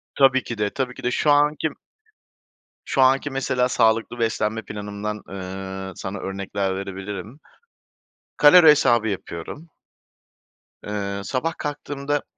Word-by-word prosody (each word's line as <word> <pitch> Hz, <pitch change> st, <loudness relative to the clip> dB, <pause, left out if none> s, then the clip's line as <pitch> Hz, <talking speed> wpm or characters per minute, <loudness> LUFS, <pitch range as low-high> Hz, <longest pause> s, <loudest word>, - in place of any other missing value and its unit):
Tabii 135 Hz, -1 st, +4 dB
ki 115 Hz, -, -6 dB
de, 105 Hz, -1 st, 0 dB
tabii 130 Hz, +2 st, -3 dB
ki -, -, -12 dB
de 125 Hz, -, 0 dB
şu 145 Hz, +4 st, +2 dB
anki 150 Hz, +2 st, +3 dB, 1.2 s
Şu 135 Hz, -, +1 dB
anki 135 Hz, +2 st, +4 dB
mesela 130 Hz, -2 st, 0 dB
sağlıklı 115 Hz, 0 st, +1 dB
beslenme 110 Hz, -1 st, 0 dB
planımdan, 105 Hz, 0 st, -5 dB
eee, 95 Hz, 0 st, -6 dB
sana 95 Hz, +1 st, -5 dB
örnekler 95 Hz, 0 st, -3 dB
verebilirim. 95 Hz, -, -6 dB, 1.0 s
Kalori 160 Hz, +3 st, +8 dB
hesabı 120 Hz, -6 st, +3 dB
yapıyorum. 100 Hz, -, -6 dB, 1.2 s
Eee, 100 Hz, -1 st, -3 dB
sabah 140 Hz, +10 st, -2 dB
kalktığımda 145 Hz, -1 st, -3 dB
115 Hz, 115 wpm, -23 LUFS, 100-135 Hz, 1.2 s, Kalori